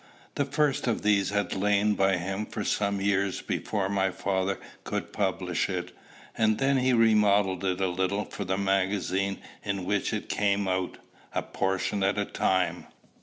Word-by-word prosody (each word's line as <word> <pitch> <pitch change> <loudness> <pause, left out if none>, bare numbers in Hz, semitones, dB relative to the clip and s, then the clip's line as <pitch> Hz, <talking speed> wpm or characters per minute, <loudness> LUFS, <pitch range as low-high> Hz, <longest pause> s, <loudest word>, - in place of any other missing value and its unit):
The 140 - 0
first 145 -1 +1
of 115 - 0
these 105 -2 +3
had 100 -2 -1
lain 105 +2 +2
by 95 -2 +2
him 95 +4 -3
for 105 - -4
some 100 0 0
years 100 -1 0
before 100 -3 -1
my 95 -1 +1
father 95 +1 -1 0.2
could - - -4
publish - - 0
it; - - -3 0.4
and 110 -1 +2
then 135 0 +2
he 130 0 +2
remodelled 105 -5 +4
it 95 -1 0
a 95 - +2
little 95 +3 -1
for 100 - -6
the 95 0 -1
magazine 95 0 0 0.3
in 100 -3 -2
which 100 +1 0
it - - -3
came 100 -1 +1
out, 95 -1 -1 0.4
a - - 0
portion 95 +1 -1
at 100 +2 +2
a 100 - +1
time. 95 -2 0
100 Hz, 170 wpm, -28 LUFS, 95-105 Hz, 0.4 s, remodelled